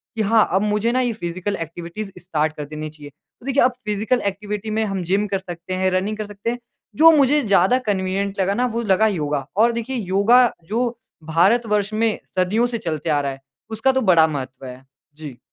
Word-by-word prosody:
कि 225 - -1
हाँ 220 +1 +3
अब 190 - +3
मुझे 210 +2 +1
ना 255 - +1
ये 245 -2 0
फिज़िकल 185 0 -4
एक्टिविटीज़ 170 +5 -6
स्टार्ट 155 -4 -1
कर 150 - -5
देनी 155 +1 -6
चाहिए। 150 -1 -12
तो 150 - -24
देखिए 275 0 +2
अब 255 - +4
फिज़िकल 215 +4 0
एक्टिविटी 210 +2 -4
में 220 +1 0
हम 195 -3 -3
जिम 195 +4 +1
कर 195 -1 -1
सकते 175 0 -7
हैं, 185 0 +1
रनिंग 195 +4 -1
कर 215 - -4
सकते 205 +2 -5
हैं। 240 +1 -3 0.4
जो 325 +2 +8
मुझे 285 +1 +4
ज़्यादा 200 +2 +3
कन्वीनिएंट 195 0 -1
लगा 190 +1 +1
ना 245 +4 +1
वो 235 - 0
लगा 215 +1 +3
योगा 150 -8 -2
और 230 +3 +5
देखिए 235 +3 -4
योगा 205 +4 +4 0.3
जो 240 +3 0 0.4
भारत 200 +9 +4
वर्ष 210 0 0
में 220 0 0 0.2
सदियों 195 +6 +2
से 240 -1 -3
चलते 165 -5 -4
आ 150 -2 +2
रहा 140 -1 -2
है 135 0 -10 0.3
उसका 220 +5 +2
तो 265 0 0
बड़ा 170 -7 +5
महत्व 135 -3 -6
है। 125 0 -10 0.3
जी। 150 -5 -9
200 Hz, 215 wpm, -21 LUFS, 170-220 Hz, 0.4 s, जो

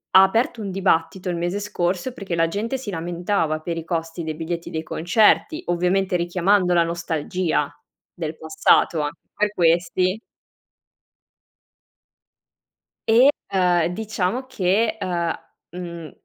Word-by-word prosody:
ha 190 - +11
aperto 225 +4 +1
un 200 - -4
dibattito 185 -1 0
il 175 - -1
mese 175 +4 -1
scorso 195 +2 -2
perché 195 -7 -4
la 165 0 +2
gente 215 +9 -2
si 250 -5 -6
lamentava 170 -1 -1
per 165 +1 -4
i 165 - -4
costi 165 0 -3
dei 155 -1 -4
biglietti 170 +2 -4
dei 160 0 -4
concerti, 215 - +2
ovviamente 180 +2 +1
richiamando 180 +2 +2
la 170 - +5
nostalgia 165 -2 -1 0.4
del 160 -2 -5
passato 160 0 +2
a 145 - 0 0.3
per 210 0 +1
questi 180 +4 +2 2.9
e, 240 +5 +7 0.2
uhm, 180 -3 +3
diciamo 215 +5 -2
che, 215 -1 +1
uhm, 175 -4 -1 0.4
mhmm, 170 -2 -7
180 Hz, 125 wpm, -22 LUFS, 165-200 Hz, 2.9 s, ha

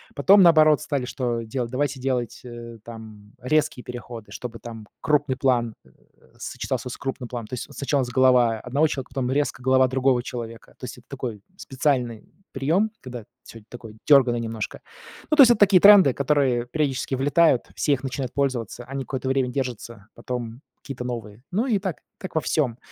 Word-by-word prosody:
Потом 195 +8 +6
наоборот 155 -4 +6
стали 140 -4 -2
что 120 -2 -2
делать? 120 +1 -4
Давайте 140 0 -1
делать 125 -3 -2
э 120 -1 -9
там 110 -3 -12
резкие 130 -1 0
переходы, 120 -2 -9
чтобы 120 -2 -7
там 115 -3 -10
крупный 145 -3 +1
план, 120 -4 +1
э, - - -21 0.5
сочетался - - -4
с - - -7
крупным 130 -3 -5
планом, 120 -3 -6
то - - -13
есть 125 - -5
сначала 140 0 -1
с 120 - -5
голова 125 -3 +3
1 125 +4 -7
человека, 135 -3 -5
потом 130 -2 -1
резко 145 -2 -1
голова 130 0 +4
другого 130 -1 +1
человека, 115 -3 -8
то - - -22
есть 125 - -8
это 120 - -17
такой 125 -7 -6 0.2
специальный 125 - -2 0.2
приём, 165 +11 +1
когда 125 -4 -8 0.2
всё 115 - -12
такое 115 -3 -11
дёрганное 130 -5 +5
немножко, 115 -2 -5 0.5
ну, 305 - +1
то - - +10
есть 240 - +6
это 235 - +2
такие 195 -2 +6
тренды, 200 -9 +8
которые 135 -4 +1
периодически 135 -1 -2
влетают, 145 0 +3
все 145 - +1
их 135 - -3
начинают 130 -1 -4
пользоваться, 130 -4 -2
они 135 +1 -5
какое-то 130 0 -4
время 130 -1 +1
держатся, 120 -5 -5
потом 120 -1 -6 0.2
какие-то 135 -3 -7
новые. 115 -2 -7
Ну 215 +8 0
и 225 -5 +2
так, 190 -3 -4 0.2
как 185 - -9
во 160 - +2
всём. 130 -8 0
130 Hz, 180 wpm, -24 LUFS, 120-140 Hz, 0.5 s, то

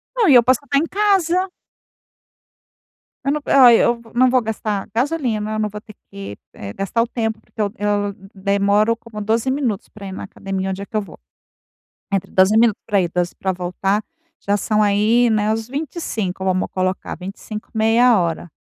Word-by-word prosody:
Não, 465 -5 +3
e 275 - +7
eu 240 - +8
posso 255 +1 +3
até 280 0 +1
em 300 - +2
casa. 380 -2 +1 1.7
Eu 275 - +1
não 300 +1 -1
ai, 245 -4 +7
eu 235 0 +1
não 255 +1 +5
vou 255 -1 +4
gastar 215 -2 -3
gasolina, 240 -6 -1
eu 215 - -2
não 215 -1 0
vou 210 +1 -7
ter 215 0 -15 0.2
que, 195 - -8 0.2
eh, 100 0 -8
gastar 195 - 0
o - - -4
tempo, 225 -2 -2
porque 220 - -8
eu 205 -1 0
eu 205 -1 0 0.2
demoro 200 +3 +2
como 230 -2 -9
12 225 +4 +1
minutos 255 -8 -2
pra 200 -2 -10
ir - - -6
numa 190 - -6
academia, 195 -1 -4
onde 190 +1 -5
é - - -5
que 220 - -3
eu - - +1
vou. 200 - -12 0.9
Entre 195 -1 -1
12 190 +3 +4
minutos 225 -2 +3
pra 205 -3 +2
ir, 175 -2 -2
12 175 0 -1
para 190 - -1
voltar, 185 +3 -1 0.4
já 200 - 0
são 215 +1 +1
aí, 215 +4 +3
né, 215 -1 +1
os 225 0 -4
25, 245 - -4
vamos 185 0 0
colocar. 185 0 -2
25, 205 +3 -8
meia 225 +2 +4
hora, 170 -1 -2
215 Hz, 190 wpm, -20 LUFS, 195-240 Hz, 1.7 s, eu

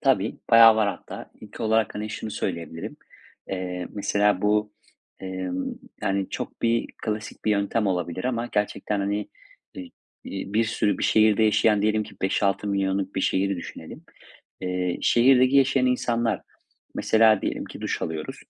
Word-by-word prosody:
Tabii. 120 -7 +1
Bayağı 115 -1 +8
var 110 -2 +2
hatta. 100 - -7
İlk 105 +1 -12
olarak, 110 -1 +1
hani, 105 +1 -4
şunu 110 0 -5
söyleyebilirim; 85 -4 -5 0.5
eee, 90 -2 -4
mesela 105 -1 +1
bu, 105 0 +1 0.5
emm, 95 -1 -4 0.4
yani, 95 -1 0
çok - - -6
bir 115 0 +2 0.2
klasik 110 0 -5
bir 110 - +2
yöntem 105 +1 +1
olabilir 90 -1 -2
ama 120 -2 -1
gerçekten, 105 0 -1
hani, 100 +1 -2 0.5
eee, 275 -2 -8 0.3
iii, 95 +1 -6
bir 115 +1 +3
sürü 110 -1 0
bir - - -4
şehirde 110 0 +4
yaşayan 105 -1 +3
diyelim 110 0 +2
ki - - -11
5-6 100 +1 0
milyonluk 95 -1 -1
bir - - -1
şehri 95 +1 +1
düşünelim. 85 - -9 0.6
Eee, 90 -1 -2
şehirdeki 130 +2 +5
yaşayan 135 -1 +4
insanlar, 120 -4 0 0.5
mesela, 110 -2 +4
diyelim - - -2
ki - - -10
duş - - -3
alıyoruz. 80 -1 -4
105 Hz, 150 wpm, -25 LUFS, 95-110 Hz, 0.6 s, Bayağı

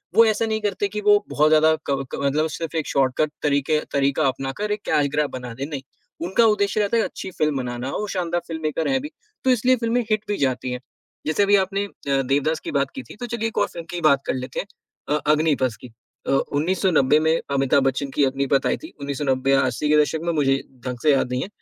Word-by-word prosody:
वो 230 - +8
ऐसा 220 +1 +1
नहीं 220 0 -1
करते 205 -1 -1
कि 210 +1 -5
वो 205 0 +4
बहुत 150 +1 +3
ज़्यादा 155 0 +5
क 140 - +3 0.2
क - - -6
मतलब 150 +3 +2
सिर्फ 165 +2 -5
एक 160 -2 -1
शॉर्टकट 135 +3 +1
तरीके 145 +1 +2
तरीका 140 +2 +2
अपना 135 +1 -2
कर 210 0 -1
एक 210 0 -2
कैश 145 -1 +3
ग्रैब 150 -1 +1
बना 125 -2 -6
दें 135 +4 -5
नहीं, 145 -2 -5 0.5
उनका 210 +5 +3
उद्देश्य 205 -2 +2
रहता 205 +3 +1
है 225 - +3
अच्छी 190 - -6
फ़िल्म 150 -4 0
बनाना, 125 0 -4
वो 210 - -3
शानदार 175 -3 -1
फ़िल्ममेकर 160 -1 -2
हैं 265 -1 +1
भी, 295 - -6 0.3
तो 260 - +2
इसलिए 255 +1 +4
फिल्में 235 0 0
हिट 215 0 +1
भी 205 -1 -1
जाती 130 -2 -1
है। 125 - -3 0.5
जैसे 155 +6 +2
अभी 200 0 +4
आपने 195 +1 +1
अ, 140 -8 -2
देवदास 140 +4 0
की - - -6
बात 140 -1 0
की 265 - -5
थी - - -13
तो 245 - -4
चलिए 235 -1 -2
1 225 - -7
और - - +3
फ़िल्म 170 - -8
की 175 - -5
ही 175 - -3
बात 140 -3 +4
कर - - 0
लेते 130 0 -5
हैं - - -3 0.5
अ, - - +1
अग्निपथ 150 -6 +1
की। - - -9 0.4
अ, - - +1
1990 150 0 +2
में 160 +1 +2 0.2
अमिताभ 135 0 +3
बच्चन 135 +1 0
की 145 - +3
अग्निपथ 135 +1 +1
आई - - +1
थी, 320 - -11
1990 135 -1 0
या 135 - +5
80 130 +4 -1
के 150 - +5
दशक 155 +2 -1
में, 170 - 0
मुझे 135 -3 +2 0.3
ढंग 125 -1 -3
से 155 - +5
याद 135 -2 +1
नहीं 125 0 -1
है, - - -3
155 Hz, 240 wpm, -23 LUFS, 135-200 Hz, 0.5 s, वो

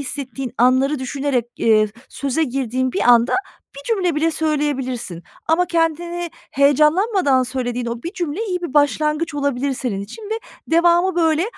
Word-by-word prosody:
hissettiğin 270 -2 -5
anları 260 +4 +3
düşünerek, 260 -1 -1
eee, 215 -1 +3 0.2
söze 280 +3 -1
girdiğin 260 -1 -2
bir - - -1
anda 235 +1 +5 0.4
1 280 - -9
cümle 365 -5 0
bile 315 +2 +1
söyleyebilirsin 270 - -2 0.3
ama 350 +3 +3
kendini 340 +1 -1 0.2
heyecanlanmadan 300 - +3
söylediğin 250 -1 -3
o 235 0 -4
1 340 - -5
cümle 350 +3 -3
iyi 360 -2 -2
bir 305 -4 -5
başlangıç 300 +2 +1
olabilir 280 -1 -1
senin 240 -7 -3
için 215 - -9
ve 445 - -1 0.3
devamı 345 +3 +3
böyle 325 -1 +2
285 Hz, 145 wpm, -20 LUFS, 255-330 Hz, 0.4 s, anda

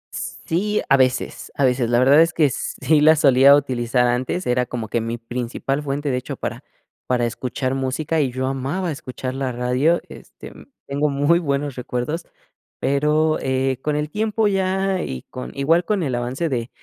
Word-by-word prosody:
Sí, 210 +6 -2
a 135 - +6
veces, 130 -1 0
a 140 - +2
veces, 125 -2 +1
la 120 - +3
verdad 135 +5 +6
es 165 0 +3
que 150 -5 +3
sí 145 +5 0
la 155 +1 +7
solía 140 -1 +6
utilizar 125 -3 +1
antes, 125 +9 -1
era 125 0 +1
como 115 -3 -4
que 115 +1 -1
mi 115 +1 -3
principal 120 +4 -3
fuente, 145 0 -2
de 125 - 0
hecho, 125 - -6
para - - -5 0.4
para 125 -1 +1
escuchar 130 +2 -3
música 135 +4 -1
y 135 -3 0
yo 130 +1 -2
amaba 135 +8 -2
escuchar 130 -3 -6
la 135 -1 -2
radio, 125 +7 +1
este, - - -12 0.3
tengo 145 +2 0
muy 145 +4 +3
buenos 140 -3 -2
recuerdos, 125 +6 -3 0.5
pero, 150 +3 +2
eh, 130 -1 0
con 150 +1 -1
el 150 0 -2
tiempo 215 0 0
ya 190 -1 0
y 65 -1 -5
con 125 - -7
igual 160 +6 +2
con 200 -1 0
el 135 -5 -2
avance 125 +7 -2
de 120 -2 -2
135 Hz, 180 wpm, -21 LUFS, 125-155 Hz, 0.5 s, la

